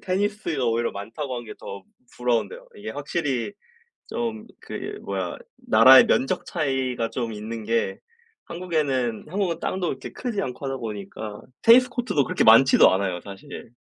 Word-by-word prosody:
테니스가 195 -6 -1
오히려 115 0 0
많다고 115 +7 -5
한 120 - -6
게 - - -9
더 100 0 -8 0.3
부러운데요. 125 - -1
이게 - - -7
확실히 145 - -2 0.6
좀 225 -2 -4
그 - - -9
이 415 0 -6
뭐야 - - -4 0.3
나라의 130 - +8
면적 135 - +1
차이가 130 -7 -1
좀 120 -3 -3
있는 110 +1 -6
게 115 -3 0 0.5
한국에는 145 -10 -1
한국은 180 -1 -1
땅도 185 -2 -2
그렇게 130 -3 -5
크지 235 -5 -3
않고 130 0 -5
하다 135 0 -2
보니까 105 -1 -6 0.2
테니스 250 +2 +7
코트도 245 - 0
그렇게 - - 0
많지도 115 +4 +7
않아요 95 -2 -1
사실. 105 +4 -10
130 Hz, 340 characters per minute, -24 LUFS, 115-185 Hz, 0.6 s, 나라의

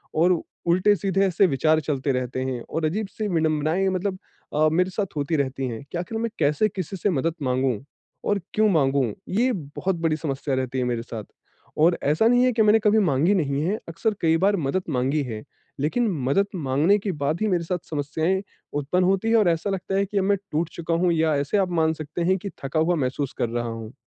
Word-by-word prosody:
और 170 +1 +3 0.3
उल्टे 185 +4 +4
सीधे 195 0 +1
ऐसे 185 +2 +3
विचार 155 +1 +2
चलते 140 -2 -1
रहते 125 0 -2
हैं 130 -2 -3
और 160 0 -1
अजीब-सी 210 +5 -2
विडंबनाएँ 160 +1 +1
मतलब 185 +1 -2 0.4
अ, 155 +1 +4
मेरे 180 +3 +2
साथ 195 -2 -3
होती 145 +3 0
रहती 135 -2 -1
हैं 115 +1 -6
कि - - -3
आखिर 180 +6 -4
मैं 230 0 -1
कैसे 150 +9 +3
किसी 190 -1 -5
से 205 - 0
मदद 165 -1 0
माँगू 130 -2 +1 0.5
और 205 - +2
क्यों 215 0 +3
माँगू? 140 -6 +2 0.3
ये 240 +7 +2
बहुत 175 +2 -3
बड़ी 165 -2 +2
समस्या 140 -3 -2
रहती 130 0 -2
है - - +1
मेरे 120 -2 -1
साथ 115 -2 -7 0.5
और 170 +3 +4
ऐसा 155 +10 +3
नहीं 245 +1 +4
है 255 - +3
कि 225 - +2
मैंने 215 +1 +5
कभी 215 0 +3
माँगी 165 0 +3
नहीं 140 -5 0
है, 200 +6 0
अक्सर 210 +6 -1
कई 165 -1 +3
बार 200 +4 +3
मदद 165 +4 -1
माँगी 135 +4 +1
है, 110 -4 -6 0.4
लेकिन 195 - +1 0.2
मदद 195 +8 +2
माँगने 155 +6 +2
के 200 0 -2
बाद 150 +2 -2
ही 215 - +2
मेरे 180 -4 +1
साथ 180 0 -3
समस्याएँ 160 +5 -1 0.3
उत्पन्न 145 +6 0
होती 195 +4 +1
हैं 230 - +4
और 210 -5 +4
ऐसा 165 +4 0
लगता 195 0 -2
है 200 +1 +2
कि 205 +1 -4
अब - - +1
मैं 200 0 +3
टूट 160 +2 0
चुका 170 0 -3
हूँ 180 - +4
या 160 -1 +2
ऐसे 140 +8 0
आप 190 -2 +1
मान 160 0 +2
सकते 155 +1 -6
हैं 185 +3 +2
कि 200 +2 -6
थका 140 +4 -1
हुआ 170 +3 +2
महसूस 135 -1 -2
कर 120 - 0
रहा 120 0 -2
हूँ। 115 0 -7
165 Hz, 220 wpm, -24 LUFS, 140-195 Hz, 0.5 s, मैंने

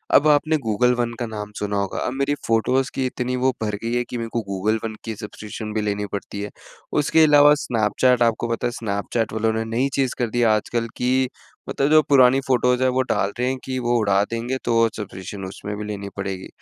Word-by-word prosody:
अब 150 - +6
आपने 155 +1 +3
Google 125 +3 +3
one 120 -1 -1
का 120 - -1
नाम 105 -1 -6
सुना 105 0 -2
होगा, 100 -1 -2
अब - - -2
मेरी 140 +2 0
फ़ोटोज़ 125 +4 +1
की 130 - 0
इतनी 125 0 -2
वो 130 +1 +2
भर 105 -1 -1
गई 115 +1 -2
है 120 - +1
कि 125 - -4
मेरे 115 -1 -4
को 115 - 0
गूगल 100 +3 0
वन 110 -1 -4
की 110 - -5
सब्सक्रिप्शन 105 +1 -7
भी 110 - 0
लेनी 105 0 -1
पड़ती 100 0 -5
है। 105 - -4 0.5
उसके 160 +2 +4
अलावा 145 -1 +7
स्नैपचैट 120 +3 +2
आपको 115 0 +1
पता 115 +1 -1
है, - - -2
स्नैपचैट 110 0 -2
वालों 110 0 +1
ने 110 0 -1
नई 135 +3 +2
चीज़ 135 -2 0
कर 120 -2 0
दी 120 +2 0
आजकल 115 +2 -2
कि 130 +1 +1 0.4
मतलब 140 - 0
जो 155 0 +7
पुरानी 130 -1 +6
फ़ोटोज़ 125 -1 +2
हैं, 130 - +4
वो 130 +1 +1
डाल 100 -5 0
रहे 125 - +1
हैं 130 - -2
कि 130 -1 -3
वो 120 -1 +1
उड़ा 100 -2 +3
देंगे, 120 +3 -2
तो 115 -1 +3
सब्सक्रिप्शन 95 -1 -7
उसमें 100 +2 -6
भी 105 - -5
लेनी 100 -1 -5
पड़ेगी। 95 -1 -4
115 Hz, 225 wpm, -22 LUFS, 105-130 Hz, 0.5 s, अलावा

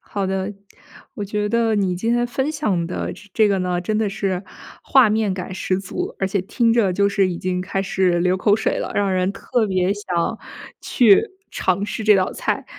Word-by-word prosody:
好 200 -2 -4
的。 190 +1 -2 0.6
我 210 -6 -4
觉 210 +1 -2
得 230 -1 +1
你 195 -3 +1
今 225 +6 -2
天 240 0 +1
分 265 +4 -2
享 210 - -1
的 180 - -4
这 205 - -14
这 215 -2 +4
个 195 - +1
呢， 180 -1 -1
真 215 +4 -1
的 220 - +1
是 195 -2 -2 0.4
画 255 -5 +5
面 215 -3 +1
感 185 0 -6
十 185 0 -1
足， 195 -1 -5
而 195 - 0
且 195 +1 -1
听 230 +5 +1
着 225 -5 +3
就 200 +2 +2
是 200 -1 +2
已 175 - -3
经 180 0 -2
开 195 +1 -2
始 185 -2 +1
流 180 +1 +2
口 205 +2 +3
水 220 - -1
了， - - -4
让 200 -2 +1
人 185 0 +1
特 220 +3 -1
别 185 -1 +1
想 180 -5 -2 0.4
去 220 -7 +5 0.3
尝 190 +2 0
试 215 - -4
这 210 -1 +5
道 185 -1 0
菜， - - -2
195 Hz, 225 characters per minute, -21 LUFS, 185-215 Hz, 0.6 s, 画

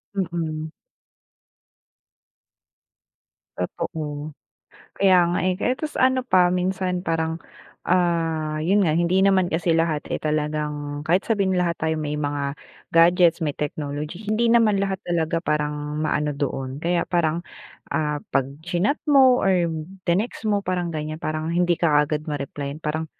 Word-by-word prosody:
Mm. 165 -4 -3 2.9
Totoo. 150 -1 -4 0.7
Kaya 195 -1 +5
nga, 175 - 0
eh, 185 - +2
kaya 210 +7 0
ta's 310 +1 -5
ano 255 0 +2
pa 185 -6 +4
minsan 180 0 -1
parang, 160 0 -1 0.5
ah, 165 -3 +1
'yun 185 +7 +2
nga 160 -4 +2
hindi 175 +2 +2
naman 190 -3 +3
kasi 170 +1 +1
lahat, 165 -2 +1
eh, - - -1
talagang 150 -1 -2
kahit 180 +4 +3
sabihin 200 -4 +2
lahat 175 -2 0
tayo 160 0 0
may 150 0 -3
mga 145 -1 -2 0.3
gadgets, 170 0 +5
may 155 -4 -1
technology, 150 +2 -4
hindi 220 +3 +1
naman 220 -4 +4
lahat 195 -1 -1
talaga 165 -1 0
parang 150 0 -1
maano 150 -1 0
doon. 135 0 -4
Kaya 175 0 +1
parang, 170 -1 0 0.5
ah, 150 -1 0 0.2
pag-chinat 175 - 0
mo 265 -4 +6
or 180 -3 +3 0.4
tinext 215 +4 0
mo 205 -1 0
parang 180 -1 -1
ganyan, 155 0 -5
parang 155 +1 -2
hindi 175 -1 +2
ka - - 0
kaagad 150 +1 +2
ma-replayan 145 0 -5
parang 155 +1 -2
165 Hz, 135 wpm, -23 LUFS, 150-185 Hz, 2.9 s, mo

